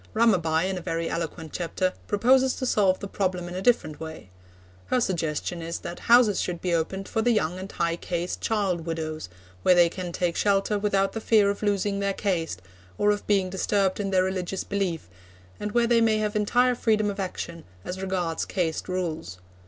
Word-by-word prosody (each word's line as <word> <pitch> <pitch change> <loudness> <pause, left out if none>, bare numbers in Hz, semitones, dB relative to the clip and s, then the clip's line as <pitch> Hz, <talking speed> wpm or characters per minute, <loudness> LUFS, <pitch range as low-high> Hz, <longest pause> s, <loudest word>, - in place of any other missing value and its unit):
Ramabai, 185 -7 +3
in 190 -1 -2
a - - -9
very 165 -1 -2
eloquent 165 -1 -4
chapter, 185 +1 -1
proposes 255 +5 +3
to 255 - -3
solve 195 -6 +3
the 200 - -5
problem 185 -3 -2
in 175 - -7
a 185 - -3
different 190 -9 +2
way. 160 -12 -8 0.6
Her 255 - +2
suggestion 170 -4 -2
is 165 +1 -4
that 175 - -6
houses 235 -4 +6
should 175 -2 -3
be 180 -1 -1
opened 190 +4 -1
for 225 - -1
the 245 - +2
young 185 -6 +1
and 190 +1 -7
high 170 0 -1
caste 175 0 -3
child 190 -7 0
widows, 155 - -4 0.3
where 180 - +5
they 175 -1 +6
can 180 0 -5
take 170 0 -1
shelter 200 +1 +2
without 195 -1 +1
the 225 - -4
fear 210 -3 +4
of 200 - -6
losing 200 -1 0
their 200 -1 0
caste, 165 - -2 0.3
or 210 - +3
of 205 - -3
being 195 -3 +2
disturbed 195 0 +1
in 200 -1 -1
their 185 -1 +3
religious 190 0 -2
belief, 190 - -2 0.5
and 210 0 -4
where 240 -1 +4
they 235 0 +4
may 220 -1 +3
have 215 0 -1
entire 245 +4 +3
freedom 215 -3 +1
of 200 - -8
action 170 -3 -5 0.2
as 185 +1 -5
regards 180 -4 -1
caste 170 -2 -2
rules. 165 - -3
190 Hz, 195 wpm, -26 LUFS, 170-205 Hz, 0.6 s, houses